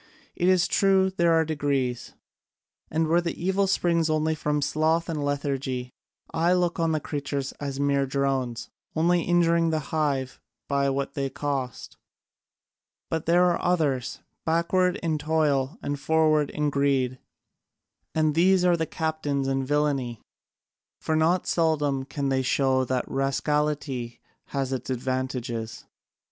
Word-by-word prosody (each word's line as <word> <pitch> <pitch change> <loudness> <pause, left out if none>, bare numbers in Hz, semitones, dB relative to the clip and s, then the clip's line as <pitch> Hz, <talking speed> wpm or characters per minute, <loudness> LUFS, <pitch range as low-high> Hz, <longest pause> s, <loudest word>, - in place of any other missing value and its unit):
It 175 - 0
is 185 -2 +4
true 190 -1 +3
there 170 -2 +2
are 160 0 +3
degrees, 140 -5 -1 0.8
and 160 +1 0
where 170 +2 +3
the 170 -1 -4
evil 190 +3 +1
springs 170 -4 +1
only 155 0 +1
from 150 -1 -1
sloth 160 +3 +1
and 155 -4 -2
lethargy, 135 -3 -2 0.4
I 170 +2 +2
look 175 -1 0
on 165 -1 +2
the 155 - +1
creatures 140 -2 -3
as 140 -1 -4
mere 140 -1 +1
drones, 135 -3 -1 0.2
only 170 +2 +3
injuring 170 -1 +3
the 160 - +1 0.2
hive 140 -4 -1 0.3
by 140 -1 +1
what 135 0 -2
they 135 -1 -2
cost: 135 -4 -4 1.1
but 160 -1 -2
there 175 +2 +5
are 170 - -1
others, 145 -8 0 0.2
backward 175 +3 +2
in 160 -2 0
toil 150 0 +1
and 145 0 -2
forward 155 0 +2
in 150 -1 -1
greed, 135 -3 +1 1.0
and 155 -1 +2
these 180 +3 +4
are 175 -1 +4
the 160 -1 -2
captains 150 -4 -2
in 135 0 0
villainy: 135 -4 0 0.8
for 160 - -1
not 165 +3 +2
seldom 150 -5 +1
can 140 0 -3
they 135 -1 +1
show 130 0 +2
that 125 0 -1
rascality 135 -3 -1 0.3
has 135 -1 -2
its 130 -1 -4
advantages. 125 -3 -3
150 Hz, 140 wpm, -26 LUFS, 135-165 Hz, 1.1 s, there